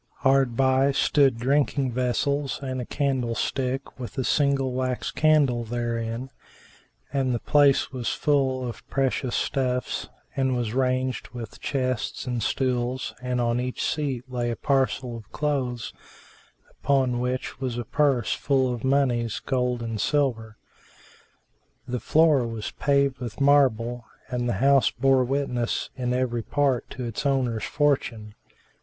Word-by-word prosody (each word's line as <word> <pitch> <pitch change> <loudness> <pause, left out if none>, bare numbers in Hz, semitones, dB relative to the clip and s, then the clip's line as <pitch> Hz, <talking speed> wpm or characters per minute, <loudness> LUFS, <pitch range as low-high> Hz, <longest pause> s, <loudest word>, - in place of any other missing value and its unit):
Hard 135 -3 +3
by 135 +1 +3
stood 135 -3 +3
drinking 135 +1 +1
vessels 135 +3 0
and 130 -1 -3
a 120 - -7
candlestick 130 -1 -2
with 125 - -7
a 130 - 0
single 140 -1 +2
wax 130 -1 -2
candle 145 -6 +3
therein; 115 +1 -3 0.8
and 130 -3 +1
the - - -2
place 145 +1 +3
was 125 -3 -3
full 135 -4 +1
of 120 - -7
precious 135 -2 0
stuffs 125 -2 -1 0.3
and 130 -1 +1
was 115 -3 -2
ranged 130 0 0
with 115 -3 -7
chests 130 -4 -2
and 125 -2 -2
stools, 125 +2 -1
and 125 0 -1
on 120 0 +1
each 125 0 -3
seat 140 -5 -2
lay 120 -2 -2
a 120 - -2
parcel 130 -1 0
of 110 -2 -11
clothes 130 -6 -2 0.8
upon 130 -3 +1
which 125 0 -3
was 130 -3 -3
a 120 - -3
purse 140 -2 +1
full 130 -3 +1
of 120 - -6
monies, 130 -5 +1
gold 125 -3 -1
and 115 -2 -3
silver. 115 -7 0 1.3
The 125 0 -2
floor 150 -5 +3
was 115 -2 -5
paved 140 -2 +1
with 120 -1 -6
marble 120 -4 +3 0.2
and 120 -1 -1
the - - +1
house 135 +5 +4
bore 135 0 +3
witness 125 -2 -1
in 125 -2 -2
every 125 -2 0
part 135 0 0
to 125 - -6
its 115 -2 -4
owner's 130 -6 0
fortune. 125 -7 0
130 Hz, 140 wpm, -25 LUFS, 120-135 Hz, 1.3 s, house